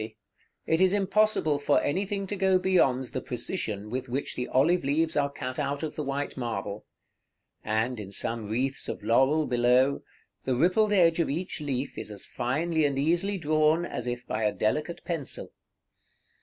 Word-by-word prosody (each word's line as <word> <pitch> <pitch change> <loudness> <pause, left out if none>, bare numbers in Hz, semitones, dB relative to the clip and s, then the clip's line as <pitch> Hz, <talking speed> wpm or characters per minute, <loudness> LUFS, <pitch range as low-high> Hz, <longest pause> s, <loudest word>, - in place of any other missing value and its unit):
369), - - -1
it 160 - +3
is 190 0 +4
impossible 200 -6 +2
for 145 0 +3
anything 195 +4 -1
to 205 - -3
go 190 -1 +3
beyond 180 -9 +2
the 130 - -2
precision 110 - -3
with 130 +1 -3
which 135 +4 -2
the 125 - -3
olive 160 +7 +3
leaves 160 +4 +1
are 140 -1 +2
cut 130 -1 -5
out 140 +1 -2
of 155 - -4
the - - -3
white 140 0 -3
marble; 105 -4 -4 0.8
and, 110 +3 -1
in 100 -2 -7
some 110 +1 -3
wreaths 130 +5 -2
of - - -5
laurel 135 +6 +3
below, 125 +2 +3 0.4
the 130 - 0
rippled 185 - +3
edge 175 -4 +4
of 165 - +1
each 170 +3 -3
leaf 135 -2 -3
is - - -6
as 105 -2 -6
finely 155 +7 -1
and 140 -2 +1
easily 175 +8 +2
drawn, 155 +1 +2
as 125 -7 -5
if 120 0 -4
by 110 - -3
a 105 - +3
delicate 150 +12 -2
pencil. 165 -6 -4
140 Hz, 175 wpm, -27 LUFS, 125-170 Hz, 0.8 s, is